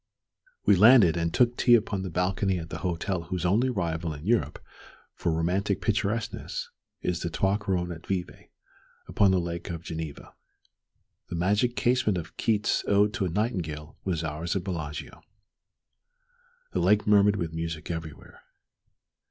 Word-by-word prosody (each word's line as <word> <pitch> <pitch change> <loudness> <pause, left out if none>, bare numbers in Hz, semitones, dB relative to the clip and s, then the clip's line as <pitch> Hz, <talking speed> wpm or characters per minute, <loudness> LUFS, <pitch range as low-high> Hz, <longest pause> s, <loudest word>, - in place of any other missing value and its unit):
We - - +6
landed, 105 -4 +7
and 85 -1 0
took 120 +4 +3
tea 120 -1 +5
upon 105 -4 0
the 95 - -4
balcony 95 +2 0
at 80 -1 -7
the - - -5
hotel 90 0 -2
whose 90 0 -3
only 110 +9 +3
rival 85 -7 -2
in 75 +2 -10
Europe 115 +2 +1 0.6
for 85 - -1
romantic 90 +4 0
picturesqueness 105 +2 -2 0.3
is 90 -2 -1
the 85 - -3
Trois 95 +4 +1
Couronnes 95 -4 -2
at 80 -2 -9
Vevey 90 -2 -4 0.6
upon 100 - +3
the 95 -1 +3
Lake 85 0 -4
of 85 -1 -5
Geneva. 80 -3 -7 1.0
The - - -4
"magic 105 +8 +1
casement" 120 -6 +2
of 80 -2 -7
Keats's 105 -2 +1
"Ode 105 +1 +3
to 110 -6 -1
a - - -1
Nightingale" 85 -7 -3
was 85 -4 -1
ours 80 +3 -3
at 95 - -1
Bellagio. 80 -6 -5 1.5
The - - 0
lake 105 0 +3
murmured 105 -1 +5
with 85 -5 -3
music 80 0 -4
everywhere. 80 -2 -8
90 Hz, 150 wpm, -27 LUFS, 85-105 Hz, 1.5 s, landed